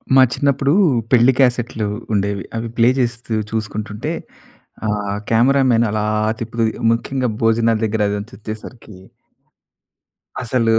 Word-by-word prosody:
మా 130 - +8
చిన్నప్పుడూ, 140 0 +1 0.4
పెళ్ళి 125 +1 +5
క్యాసెట్‌లు 120 -4 +1 0.3
ఉండేవి. 100 -1 0
అవి 115 - -3
ప్లే 115 +1 +5
చేస్తూ 120 -2 -2 0.2
చూసుకుంటుంటే, 110 +4 -4 0.8
ఆ - - 0 0.4
కెమెరామెన్ 120 0 +4
అలా 105 0 -1 0.4
తిప్పుతూ, 115 0 -1 0.3
ముఖ్యంగా 125 +2 -2
భోజనాల 115 0 +3
దగ్గర 110 0 -1
అదంతా 105 +4 -5
వచ్చేసరికి 110 0 -9 1.5
అసలు 115 -2 +1
115 Hz, 105 wpm, -19 LUFS, 110-125 Hz, 1.5 s, మా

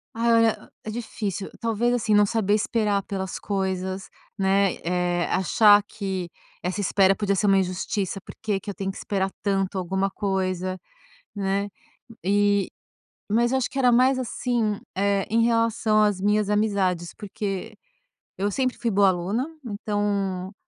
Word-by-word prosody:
Ai, 235 +1 +2 0.2
o - - -12 0.2
é - - -4
difícil. 210 -4 -4
Talvez, 230 +1 +1
assim, 225 -3 +1
não 205 0 +6
saber 205 -1 +1
esperar 210 -2 0
pelas 190 -1 -4
coisas, 190 -1 -3 0.3
né, 195 -1 +2
eh, 175 0 0
achar 205 +2 +5
que 190 -4 -4 0.3
essa 185 +3 -2
espera 195 0 +3
podia 200 -1 0
ser 205 - +1
uma 195 -1 +5
injustiça, 190 +1 -2
"Por - - -11
que 210 -3 0
que 205 - -9
eu - - -3
tenho 195 -1 -3
que - - -11
esperar 195 -1 -1
tanto 195 -1 0
alguma 190 +2 0
coisa", 185 -2 -2 0.6
né. 200 0 -1 0.5
E 200 0 +2 0.6
mas 235 +3 +3
eu 265 - +3
acho 260 - -1
que 275 - -5
era 250 -2 +4
mais, 260 +2 +4
assim, 235 -3 -1 0.2
eh, 200 0 +1
em 230 +1 +3
relação 230 -2 +2
às 205 -3 +2
minhas 210 +1 +2
amizades, 195 -5 0
porque 195 -2 -5 0.6
eu 200 +2 0
sempre 255 +4 -1
fui 235 - -1
boa 200 -2 +4
aluna, 190 +8 -1 0.2
então 200 -3 -2
200 Hz, 155 wpm, -24 LUFS, 190-215 Hz, 0.6 s, não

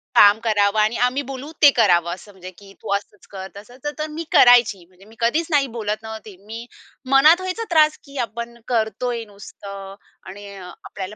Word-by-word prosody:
काम 205 +1 +7
करावं 210 -2 +2
आणि 215 +2 +2
आम्ही 255 +3 -1
बोलू 275 +2 -8
ते 290 - +9
करावं, 175 -8 +2
असं 195 +3 -12
म्हणजे 185 -2 -11
की 200 -1 -15
तू - - -6
असंच 200 0 -8
कर, 190 -1 -7
तसंच 245 +7 -14
तर 305 - -2
मी 320 +2 -5
करायची. 240 -6 +5
म्हणजे 185 +2 -22
मी 220 +2 -18
कधीच 270 +8 0
नाही 285 -4 +2
बोलत 215 -1 -3
नव्हती. 220 -2 -9
मी 225 +2 -8 0.5
मनात 305 +6 +6
व्हायचा 370 +5 -4
त्रास 310 -2 +4
की 280 -1 -12
आपण 235 0 -8
करतोय 235 0 -2
नुसतं 200 -1 -11 0.3
आणि 205 +1 -10
आपल्याला 190 +2 -9
220 Hz, 180 wpm, -21 LUFS, 200-260 Hz, 0.5 s, ते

